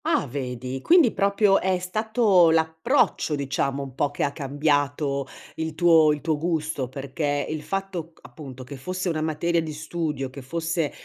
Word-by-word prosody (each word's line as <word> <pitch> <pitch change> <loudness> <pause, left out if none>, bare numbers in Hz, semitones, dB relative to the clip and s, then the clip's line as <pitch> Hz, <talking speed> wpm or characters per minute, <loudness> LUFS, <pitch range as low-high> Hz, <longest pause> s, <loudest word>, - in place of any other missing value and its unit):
Ah 330 - +2
vedi, 130 -1 -5
quindi 335 -9 +5
proprio 200 0 +3
è 185 0 +1
stato 205 -1 +3
l'approccio 160 - +1
diciamo 140 0 -2
un 135 -1 -9
po' 145 +2 0
che 145 - -3
ha 140 - +1
cambiato 145 0 0 0.3
il 160 -1 -3
tuo 165 -2 +5
il 150 -1 -2
tuo 155 -2 -1
gusto, 155 -5 -2
perché 145 +1 -2
il 155 -1 -4
fatto, 190 -2 -4
c - - -26
appunto 130 0 -10
che 135 +2 -9
fosse 185 +6 -3
una 155 -2 -1
materia 165 +2 0
di 160 -1 -5
studio, 150 -3 -3
che 140 - -9
fosse 165 +2 -2
155 Hz, 170 wpm, -24 LUFS, 140-175 Hz, 0.3 s, quindi